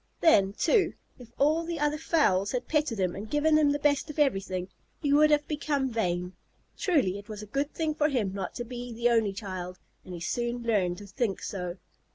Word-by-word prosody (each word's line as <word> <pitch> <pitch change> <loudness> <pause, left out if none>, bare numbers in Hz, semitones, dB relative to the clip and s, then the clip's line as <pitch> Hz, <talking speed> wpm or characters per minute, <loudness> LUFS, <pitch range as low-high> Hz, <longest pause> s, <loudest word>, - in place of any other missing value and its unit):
Then, 200 - +4
too, 405 - +2 0.3
if 240 -2 -13
all 310 +4 +3
the 335 0 -4
other 295 +1 0
fowls 205 - +2
had 250 - -2
petted 300 -8 0
him 180 -2 0
and 210 +2 -7
given 305 +1 +3
him 300 -2 +4
the 290 - +1
best 290 0 +1
of 300 - -7
everything, 195 -10 0 0.3
he 285 -1 +1
would 305 +1 +6
have 295 -1 +2
become 285 -3 -1
vain. 180 -5 -1 0.4
Truly, 265 - +1
it 205 - -14
was 210 -1 -6
a - - -7
good 275 +7 -2
thing 315 -2 -1
for 300 0 +1
him 220 -9 0
not 195 -2 -5
to 240 - -3
be 245 0 -7
the 235 +1 +1
only 225 -3 +3
child, 185 -2 -6 0.3
and 180 - -8
he - - -7
soon 240 +7 -2
learned 195 -6 +1
to 205 - -10
think 200 +1 -2
so. 180 -2 -4
240 Hz, 210 wpm, -28 LUFS, 195-295 Hz, 0.4 s, would